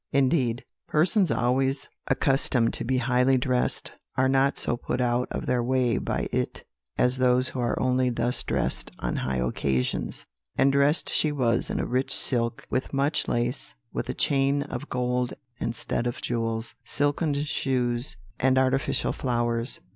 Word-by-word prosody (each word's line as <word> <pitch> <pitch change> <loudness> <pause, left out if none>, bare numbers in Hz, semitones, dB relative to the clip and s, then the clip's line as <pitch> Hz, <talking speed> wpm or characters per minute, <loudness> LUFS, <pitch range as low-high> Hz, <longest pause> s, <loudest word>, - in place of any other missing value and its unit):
"Indeed, 130 -3 +1 0.2
persons 180 +4 +3
always 135 +3 +1 0.2
accustomed 135 -3 +2
to - - -2
be 130 +2 0
highly 125 +1 +3
dressed 125 -1 0 0.3
are 130 +1 +4
not 135 +1 +2
so - - +1
put 125 +1 -3
out 125 0 +1
of - - -4
their 125 -1 +1
way 125 -1 +1
by - - -2
it - - -2 0.3
as 125 +1 +4
those 125 0 +3
who 130 - -6
are 120 -1 0
only 130 0 +2
thus 120 +1 0
dressed - - -1
on - - -2
high 65 0 -1
occasions; 65 +1 -1 0.3
and 135 0 +4
dressed 140 +3 +3
she 155 - +2
was 120 -5 +1
in - - -2
a - - 0
rich 130 +2 0
silk, 115 -3 +1
with 130 +2 -2
much 140 +3 +1
lace, 120 +3 -1 0.2
with - - -3
a - - -2
chain 140 0 +2
of 150 - -6
gold 125 0 -1 0.2
and 115 - -2
stud 120 - -2
of 120 - -3
jewels, 115 -1 -2
silken 145 +1 0
shoes, 130 -4 0 0.2
and 130 0 +3
artificial 130 +1 +1
flowers. 120 -1 -1
125 Hz, 160 wpm, -26 LUFS, 120-135 Hz, 0.3 s, are